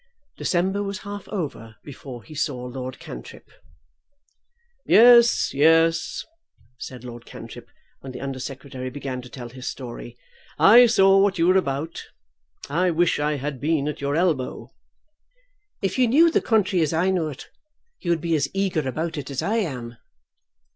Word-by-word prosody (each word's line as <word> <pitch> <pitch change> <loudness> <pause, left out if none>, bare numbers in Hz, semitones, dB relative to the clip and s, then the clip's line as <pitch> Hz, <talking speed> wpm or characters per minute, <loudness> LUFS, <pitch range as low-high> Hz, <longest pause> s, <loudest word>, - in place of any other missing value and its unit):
December 190 +3 0
was 200 0 -4
half 205 0 -7
over 140 - -5
before 130 -4 -10
he 155 - -13
saw 140 -4 -3
Lord 130 +1 -6
Cantrip. - - -11 1.3
"Yes, 235 +1 +6
yes;" 165 +3 +3 0.5
said 125 -2 -8
Lord 120 -1 -9
Cantrip, - - -11 0.3
when 135 - -9
the - - -8
Under 135 -1 -5
Secretary 130 0 -6
began 130 -1 -5
to 125 - -13
tell 120 0 -9
his 130 +2 -9
story; 120 -2 -7 0.4
"I 240 +5 +8
saw 195 -3 +5
what 195 -1 +2
you 165 - +2
were 185 +1 +4
about. 155 -3 -2 0.6
I 175 +6 +1
wish 170 -1 +1
I 150 +1 0
had 140 -2 -5
been 150 -1 0
at 150 - -4
your 140 +1 -1
elbow." 160 -7 -1 1.1
"If 195 +6 -1
you 250 - +4
knew 320 +8 +5
the - - +2
country 205 -5 +1
as 155 0 0
I 175 +4 +2
know 175 -4 0
it, 140 - -11 0.5
you 175 - -5
would 170 -2 +1
be 165 -1 0
as 140 -2 0
eager 180 -8 0
about 160 +4 -3
it 135 - -7
as 140 -1 -3
I 220 +3 0
am." 125 - -4
155 Hz, 160 wpm, -23 LUFS, 130-190 Hz, 1.3 s, I